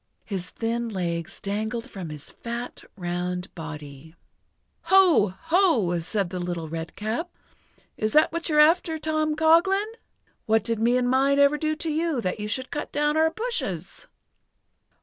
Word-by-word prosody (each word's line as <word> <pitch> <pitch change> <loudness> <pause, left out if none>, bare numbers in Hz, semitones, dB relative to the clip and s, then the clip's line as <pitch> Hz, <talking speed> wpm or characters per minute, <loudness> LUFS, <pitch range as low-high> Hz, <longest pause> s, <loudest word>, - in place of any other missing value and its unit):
His 190 -4 -4
thin 235 +1 -2
legs 170 -4 -3
dangled 220 +3 -3
from 185 -5 -7
his 150 -1 -9
fat, 235 +1 -6
round 180 0 -3
body. 155 -2 -9 0.7
"Ho! 350 - +5
Ho!" 325 - +2
said 180 +2 -2
the 185 - -3
Little 175 -2 -3
Redcap, 210 - -4 0.7
"is 215 0 0
that 305 +1 +5
what 335 0 -2
you're 300 -1 +3
after, 320 +1 +4
Tom 310 0 0
Coghlan? 350 +7 +3 0.6
What 220 -1 +3
did 230 -1 -1
me 240 +2 +3
and 250 -1 +1
mine 270 +2 +3
ever 280 +1 +5
do 310 0 0
to 315 +1 -3
you 320 -2 0
that 185 -2 -2
you 210 - -3
should 260 +4 -2
cut 295 - -4
down 295 +1 +1
our 320 0 +4
bushes?" 320 - -3
235 Hz, 150 wpm, -25 LUFS, -, 0.7 s, Ho